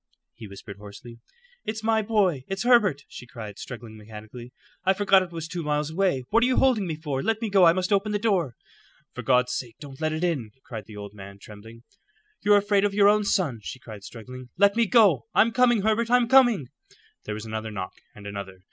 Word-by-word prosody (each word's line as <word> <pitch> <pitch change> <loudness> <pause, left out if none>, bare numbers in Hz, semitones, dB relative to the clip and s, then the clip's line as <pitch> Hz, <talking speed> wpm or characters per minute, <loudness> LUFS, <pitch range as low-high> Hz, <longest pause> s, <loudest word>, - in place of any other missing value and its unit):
he 110 - -11
whispered 100 +1 -11
hoarsely. 105 +3 -12 0.4
"It's 220 0 -5
my 220 0 +2
boy; 200 - +1
it's 195 0 -3
Herbert!" 215 - +3
she 125 - -11
cried, 110 -5 -9
struggling 115 -3 -9
mechanically. 110 +3 -11 0.3
"I 190 +1 +3
forgot 195 -1 +4
it 185 -2 -6
was 165 -1 -6
two 170 +1 -5
miles 150 0 -1
away. 170 -7 0
What 230 - +4
are - - +4
you 255 - +1
holding 235 -8 +3
me 160 - -3
for? 145 -4 -3
Let 225 +5 0
go. 195 -2 +6
I 165 - +6
must 185 +2 -1
open 200 +2 +1
the 210 - +1
door." 190 - 0 0.6
"For - - -6
God's 125 -1 +2
sake 120 -2 -5
don't 140 0 -11
let 155 0 0
it 155 +2 -3
in," 135 -12 -2
cried 110 -4 -7
the 105 -2 -11
old 100 0 -8
man, 100 -1 -11
trembling. 110 +3 -13 0.6
"You're 205 0 +5
afraid 200 0 +2
of 205 -1 0
your 205 0 +6
own 210 0 +3
son," 170 - 0
she 115 - -7
cried, 110 -5 -11
struggling. 125 +3 -10
"Let 200 +2 +4
me 230 -1 +2
go. 210 - +4
I'm 230 +3 +4
coming, 240 -3 +3
Herbert; 220 +2 +1
I'm 245 -1 +4
coming." 240 - +4 0.6
There 105 - -4
was 110 +1 -7
another 110 0 -5
knock, 95 -3 -6 0.2
and 105 - -13
another. 100 -2 -7
155 Hz, 215 wpm, -25 LUFS, -, 0.6 s, go